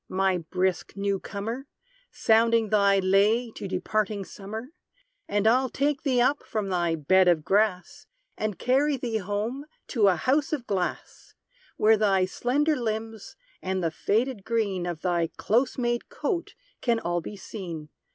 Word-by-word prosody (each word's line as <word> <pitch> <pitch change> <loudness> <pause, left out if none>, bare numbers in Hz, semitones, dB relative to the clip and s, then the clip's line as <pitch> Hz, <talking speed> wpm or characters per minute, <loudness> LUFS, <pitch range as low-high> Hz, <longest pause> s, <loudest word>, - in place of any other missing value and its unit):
my 190 -1 +1
brisk 180 +2 -1
new 200 -1 -1
comer, 230 +9 -5 0.4
Sounding 225 0 +3
thy 200 -1 +4
lay 205 +5 +3
to 200 - -7
departing 200 +2 -1
summer; 220 +7 -8 0.6
And 205 0 0
I'll 255 +4 +4
take 285 +2 0
thee 260 -5 +1
up 275 +4 +2
from 210 -3 -3
thy 175 -3 +1
bed 185 +5 +3
of 165 -4 +3
grass, 215 +8 0 0.3
And 210 -3 -3
carry 275 +3 +2
thee 235 -3 -2
home 215 +8 -3 0.2
to 220 -6 +3
a 190 - +4
house 285 - +1
of 270 -6 -2
glass; 190 -5 -4 0.4
Where 220 +1 +5
thy 195 -3 +3
slender 285 +10 +1
limbs, 225 -3 -4 0.3
and 185 -1 -2
the 165 - 0
faded 220 +5 -1
green 200 -6 -1
Of 170 -2 -4
thy 175 -2 +1
close 240 +5 +1
made 240 -1 -1
coat, 355 -7 -3 0.3
can 235 -2 +1
all 175 -3 -1
be 205 - -8
seen. 175 -6 -7
210 Hz, 150 wpm, -26 LUFS, 190-240 Hz, 0.6 s, Where